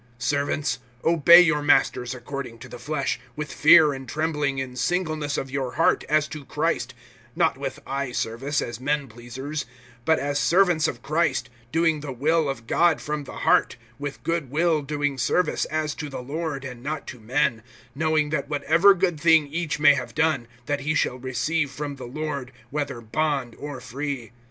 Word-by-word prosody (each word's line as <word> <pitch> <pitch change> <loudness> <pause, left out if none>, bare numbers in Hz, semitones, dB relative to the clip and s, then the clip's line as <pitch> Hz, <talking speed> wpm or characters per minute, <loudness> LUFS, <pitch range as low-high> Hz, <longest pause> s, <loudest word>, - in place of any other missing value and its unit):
(5)Servants, 145 +4 0 0.3
obey 170 +1 +8
your 165 -4 +2
masters 130 -3 +2
according 125 -1 -6
to - - -11
the - - -10
flesh, 140 +2 -2 0.2
with 150 -1 -5
fear 155 -1 +7
and 135 -2 -8
trembling, 150 -2 -1
in 130 -1 -4
singleness 155 -1 -1
of 135 - -4
your 135 -2 -2
heart, 165 - +2
as 155 0 +3
to 150 -2 -8
Christ; - - -2 0.4
(6)not - - +3
with - - -4
eye 140 -1 -3
service, 130 +5 -2
as 120 -1 -6
men 145 +1 -1
pleasers; 120 +6 -6 0.4
but 160 +4 +3
as 145 0 -1
servants 175 -2 +3
of 120 -2 -5
Christ, 155 -4 0 0.2
doing 165 -1 +2
the 145 -2 -6
will 150 +4 +1
of 120 -4 -5
God 170 +5 +3
from 150 -1 -4
the - - -9
heart; - - +4 0.2
(7)with 145 -1 -6
good 165 -5 -1
will 160 +2 +2
doing 145 -1 -2
service, 175 +6 +1
as 155 -1 -2
to 150 -1 -6
the 135 -2 -6
Lord, 145 0 -4
and 125 -2 -8
not 150 +3 -4
to 125 - -9
men; 120 0 0 0.3
(8)knowing 155 0 +1
that 140 -2 -2
whatever 160 +7 +4
good 175 -4 0
thing 160 -1 +5
each 155 +1 -3
may 145 -1 +7
have 130 -3 -5
done, 155 -7 +1 0.2
that 145 0 -2
shall 125 - 0
he 130 - -12
receive 140 +5 0
from 145 +1 -6
the 130 - -8
Lord, 140 -1 -4 0.2
whether 140 -4 -3
bond 135 +1 -1
or 145 -2 -6
free. 135 -1 -5
145 Hz, 180 wpm, -24 LUFS, 130-155 Hz, 0.4 s, obey